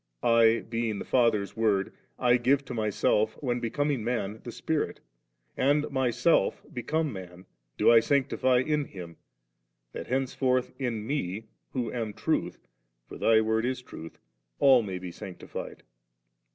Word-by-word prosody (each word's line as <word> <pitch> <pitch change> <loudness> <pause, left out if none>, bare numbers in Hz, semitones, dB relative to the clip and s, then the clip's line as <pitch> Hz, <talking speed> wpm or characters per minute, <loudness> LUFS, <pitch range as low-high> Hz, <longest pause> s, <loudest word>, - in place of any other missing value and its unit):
'I, 115 -1 +4
beinx 115 -2 -2
the - - -6
Father's 115 -5 +2
Word, 105 -4 +1 0.2
I 120 -1 +4
give 135 +3 +2
to 125 - -6
Myself, 110 -1 +1
when 125 -3 -1
becoming 140 +1 -1
man, 110 -3 -2
the 120 - -6
Spirit; 160 +4 -2 0.6
and 145 +3 +2
Myself, 130 +4 +2
become 150 +4 -1
man, 90 -1 -10 0.3
do - - +5
I 115 - +8
sanctifv 130 -1 +2
•"' 150 -2 0
Him, 85 -4 -9 0.7
that - - -7
henceforth 130 -1 0
in 115 -5 -2
Me, 110 -5 -3 0.2
who 120 -4 -2
am 115 -4 -3
Triit. - - -1 0.3
" - - -40
Thy 110 -1 +3
Word 110 0 +1
is 125 0 -2
Truth 80 -9 -10
"X - - -32 0.4
all 130 -3 +6
may 95 -4 -4
be 90 -1 -7
sanctifiea. 95 0 -8
115 Hz, 145 wpm, -28 LUFS, 105-130 Hz, 0.7 s, I